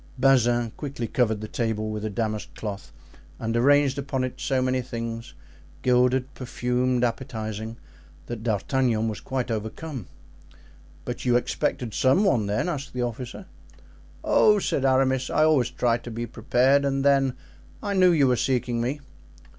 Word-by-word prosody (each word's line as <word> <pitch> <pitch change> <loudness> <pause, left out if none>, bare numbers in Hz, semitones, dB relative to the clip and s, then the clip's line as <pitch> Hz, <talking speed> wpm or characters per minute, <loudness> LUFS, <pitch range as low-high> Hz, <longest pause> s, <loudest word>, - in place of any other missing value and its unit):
Bazin 120 -3 +3
quickly 140 -4 -5
covered 110 -3 0
the 110 - -5
table 110 -2 -2
with 105 -1 -4
a 110 - -1
damask 110 +1 -3
cloth 105 -2 -6 0.5
and 115 0 -3
arranged 140 +2 +4
upon 135 -2 -2
it 130 - -4
so 135 -2 +1
many 130 0 +1
things, 115 -2 -6 0.5
gilded, 125 +1 +2
perfumed, 125 0 -1
appetizing, 110 -2 -3 0.5
that 120 -2 -6
D'Artagnan 115 +1 0
was 110 -2 -3
quite 130 -2 -3
overcome. 110 - -5 1.0
"But 125 - -5
you 125 -1 +2
expected 120 -1 -1
some 135 +10 +3
one 120 - +2
then?" 105 - 0
asked 150 -5 -4
the 125 -1 -1
officer. 125 - -5 0.8
"Oh," 210 -1 +5
said 140 -8 0
Aramis, 130 -1 +2
"I 155 - +3
always 145 -6 +3
try 120 -2 +1
to 120 - -9
be 120 +1 -4
prepared; 130 +4 +2
and 135 0 0
then 135 -2 +3 0.5
I 205 -1 -1
knew 185 -2 +5
you 150 -5 +4
were 125 -1 +3
seeking 125 -2 0
me." 135 +5 -2
125 Hz, 155 wpm, -25 LUFS, 115-135 Hz, 1.0 s, Oh